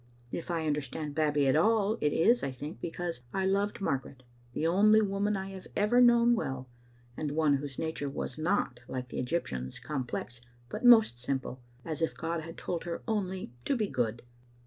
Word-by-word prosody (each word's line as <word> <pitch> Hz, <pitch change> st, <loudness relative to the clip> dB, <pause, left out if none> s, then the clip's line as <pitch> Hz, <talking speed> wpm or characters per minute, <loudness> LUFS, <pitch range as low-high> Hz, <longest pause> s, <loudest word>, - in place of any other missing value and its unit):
If 170 Hz, -, -5 dB
I 165 Hz, -2 st, -1 dB
understand 150 Hz, 0 st, -2 dB
Babbie 150 Hz, -2 st, +2 dB
at 135 Hz, -, +3 dB
all, 215 Hz, +5 st, +3 dB
it 150 Hz, -, +2 dB
is, 235 Hz, +12 st, +4 dB
I 135 Hz, -, -1 dB
think, 145 Hz, +5 st, -8 dB
because 170 Hz, -4 st, -4 dB
I 190 Hz, -1 st, +1 dB
loved 200 Hz, +2 st, 0 dB
Margaret, 135 Hz, -6 st, -2 dB, 0.3 s
the 160 Hz, -, -1 dB
only 210 Hz, +6 st, +5 dB
woman 205 Hz, 0 st, 0 dB
I 190 Hz, 0 st, -5 dB
have 190 Hz, -1 st, -9 dB
ever 225 Hz, +4 st, +4 dB
known 240 Hz, -1 st, +6 dB
well, 130 Hz, -, -2 dB, 0.5 s
and 150 Hz, +1 st, -3 dB
one 150 Hz, -2 st, +3 dB
whose 140 Hz, -1 st, -7 dB
nature 160 Hz, -3 st, -2 dB
was 135 Hz, -, -4 dB
not, 155 Hz, -7 st, 0 dB
like 125 Hz, -1 st, -5 dB
the -, -, -4 dB
Egyptian's, 65 Hz, -, -2 dB
complex, 125 Hz, -3 st, -4 dB, 0.3 s
but 215 Hz, -, -5 dB
most 225 Hz, -, +7 dB
simple, 130 Hz, 0 st, -3 dB, 0.2 s
as 160 Hz, -1 st, -4 dB
if 165 Hz, -, 0 dB
God 165 Hz, 0 st, -2 dB
had 165 Hz, +2 st, -9 dB
told 175 Hz, -1 st, -3 dB
her 170 Hz, -1 st, -4 dB
only 190 Hz, -, -2 dB
to 280 Hz, -, +1 dB
be 220 Hz, -4 st, +1 dB
good. 120 Hz, -, -2 dB
165 Hz, 185 wpm, -30 LUFS, 135-200 Hz, 0.5 s, most